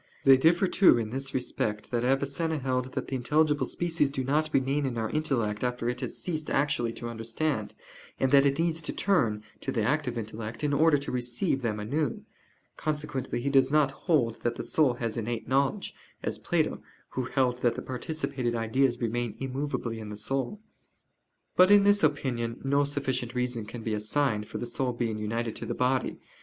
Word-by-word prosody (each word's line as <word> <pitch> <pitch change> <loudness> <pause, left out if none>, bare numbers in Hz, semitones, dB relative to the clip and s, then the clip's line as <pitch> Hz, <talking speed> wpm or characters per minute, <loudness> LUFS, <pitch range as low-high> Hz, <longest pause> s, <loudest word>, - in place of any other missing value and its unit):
They 135 -1 +8
differ, 170 +8 +4
too, 190 -5 +5
in 110 -2 -2
this 135 +2 -2
respect, 110 -4 -2
that 120 -1 0
Avicenna 140 +5 0
held 130 -2 -2
that - - -2
the - - -6
intelligible 150 +4 +2
species 165 -4 +1
do 135 -1 -3
not 150 +4 +1
remain 135 +1 +1
in 120 -3 -3
our 110 -1 -2
intellect 125 -9 -1
after 125 -1 -1
it 125 0 -3
has - - -4
ceased 155 -4 -3
actually 135 -4 +1
to 120 - -6
understand, 115 +2 -2 0.4
and 130 - +2
that 140 0 +6
it 140 0 0
needs 165 -1 0
to - - -3
turn 115 - +1 0.2
(to - - -3
the 110 - 0
active 125 0 0
intellect) 110 +2 -6
in 145 -1 +1
order 155 +1 +5
to 140 - -5
receive 125 +1 -1
them 110 -3 -1
anew. 135 +6 -2 0.5
Consequently 150 -5 -2
he 140 +3 -1
does 135 0 +4
not 150 -2 +4
hold 135 - 0
that 120 - -1
the - - -5
soul 140 -6 +2
has 115 -1 -3
innate 115 0 -3
knowledge, 140 +9 +1 0.3
as - - -2
Plato, - - 0 0.3
who 130 - -3
held 125 -1 +1
that 120 -1 +1
the - - -4
participated 130 -2 -3
ideas 120 +2 +1
remain 120 -1 -1
immovably 135 -3 -3
in 110 -1 -7
the 105 - -6
soul. 135 - -2 1.0
But 185 +1 +7
in 205 -1 +7
this 205 0 +4
opinion 130 -6 0
no 140 +1 +3
sufficient 130 -4 -2
reason 125 -3 -1
can 115 +1 -7
be 110 - -1
assigned 105 0 0
for - - -6
the - - -3
soul 125 +1 -2
being 115 -3 -2
united 115 +1 -2
to 115 - -5
the 120 - -2
body. 125 0 +1
130 Hz, 190 wpm, -28 LUFS, 115-145 Hz, 1.0 s, They